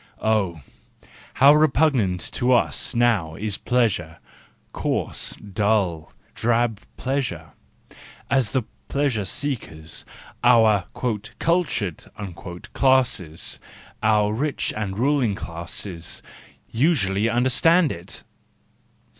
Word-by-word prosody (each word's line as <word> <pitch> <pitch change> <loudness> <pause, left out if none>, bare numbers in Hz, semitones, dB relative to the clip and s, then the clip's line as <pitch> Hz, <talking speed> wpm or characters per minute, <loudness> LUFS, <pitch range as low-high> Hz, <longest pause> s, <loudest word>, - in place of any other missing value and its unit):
Oh, 100 -7 +1 0.7
how 140 +3 +7
re¬ 150 -1 +4
pugnant 120 - +1
to 125 0 +2
us 120 +1 +1
now 110 -10 +2
is 105 +2 -3
pleasure, 100 -10 0 0.6
coarse, - - -1
dull, 100 -5 -1 0.2
drab 115 -2 +1 0.2
pleasure, 120 - -3 0.8
as 130 -5 +1
the 130 -3 0 0.2
pleasure 135 -8 0
seekers, 95 - -3 0.4
our 110 -5 +5
"cultured" 120 - -1 0.7
classes, 120 - +1 0.4
our 105 -1 +3
rich 140 +6 -1
and 100 -2 -3
ruling 130 -4 +2
classes, 85 0 -4 0.4
usually 115 - +1
under¬ 120 +3 +2
stand 165 +2 +5
it! 85 +1 -7
110 Hz, 90 wpm, -23 LUFS, 95-130 Hz, 0.8 s, how